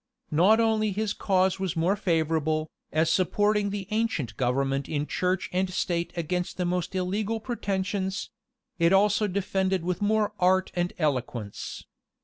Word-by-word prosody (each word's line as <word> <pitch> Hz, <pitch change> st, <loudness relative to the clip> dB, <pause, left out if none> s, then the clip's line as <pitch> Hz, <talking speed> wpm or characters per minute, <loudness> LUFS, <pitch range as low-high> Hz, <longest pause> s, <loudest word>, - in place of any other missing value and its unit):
Not 185 Hz, +9 st, +5 dB
only 220 Hz, -2 st, +2 dB
his 210 Hz, +1 st, -1 dB
cause 190 Hz, -1 st, +1 dB
was 190 Hz, -3 st, -2 dB
more 170 Hz, +5 st, +2 dB
favorable, 160 Hz, -4 st, 0 dB, 0.2 s
as 160 Hz, +1 st, +2 dB
supporting 205 Hz, +3 st, +2 dB
the 200 Hz, -2 st, -4 dB
ancient 215 Hz, -, -1 dB
government 135 Hz, +2 st, 0 dB
in 145 Hz, -1 st, -1 dB
church 185 Hz, +3 st, -1 dB
and 185 Hz, +1 st, +1 dB
state 175 Hz, -2 st, -1 dB
against 180 Hz, +2 st, -2 dB
the 180 Hz, -, 0 dB
most 180 Hz, +1 st, -2 dB
illegal 205 Hz, +4 st, -1 dB
pretensions; 195 Hz, -4 st, -2 dB, 0.5 s
it 170 Hz, +2 st, +4 dB
was -, -, +8 dB
also 210 Hz, +1 st, +3 dB
defended 190 Hz, -1 st, 0 dB
with 180 Hz, +3 st, -2 dB
more 210 Hz, 0 st, +2 dB
art 185 Hz, +1 st, +3 dB
and 175 Hz, 0 st, -1 dB
eloquence. 125 Hz, -, -3 dB
185 Hz, 145 wpm, -27 LUFS, 165-205 Hz, 0.5 s, was